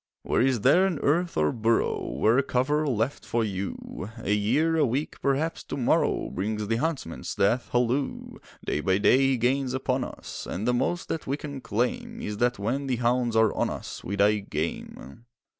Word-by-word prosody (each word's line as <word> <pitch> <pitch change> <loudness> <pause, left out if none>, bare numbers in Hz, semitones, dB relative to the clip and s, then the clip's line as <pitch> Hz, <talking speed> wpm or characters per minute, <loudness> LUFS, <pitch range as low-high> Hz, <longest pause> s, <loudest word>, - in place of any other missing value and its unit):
Where - - +1
is 130 -3 +2
there 175 - +5
an 180 -5 -2
earth 170 +4 +1
or 75 -1 +3
burrow? 115 0 0
Where 115 +4 +3
a - - +5
cover 145 +4 0
left 120 +1 -1
for 115 0 0
you? 100 -1 -5
A 105 -3 -1
year, 145 +11 +2
a 160 - +3
week, 135 +3 -2
perhaps 145 +4 0
to - - -5
morrow 125 - +1
Brings 105 +3 -2
the 115 +1 +1
Huntsman's 140 - -3
death 115 +5 +1
halloo! 125 +3 -1 0.3
Day - - -1
by 95 +3 +2
day 115 +5 +4
he 135 -1 +3
gains 130 +2 +1
upon 130 -1 0
us, - - -7
And 105 +6 -3
the 125 - +3
most 175 +8 -1
that 160 - -3
we 140 +2 -1
can 140 -3 -7
claim 230 - -2
Is 105 0 -4
that 120 +2 +1
when 125 +8 -2
the 130 - +1
hounds 120 0 +1
are 110 -2 +4
on - - 0
us - - -7
We 100 - -3
die 105 +1 +3
game. 80 - -5
125 Hz, 190 wpm, -26 LUFS, 105-140 Hz, 0.3 s, there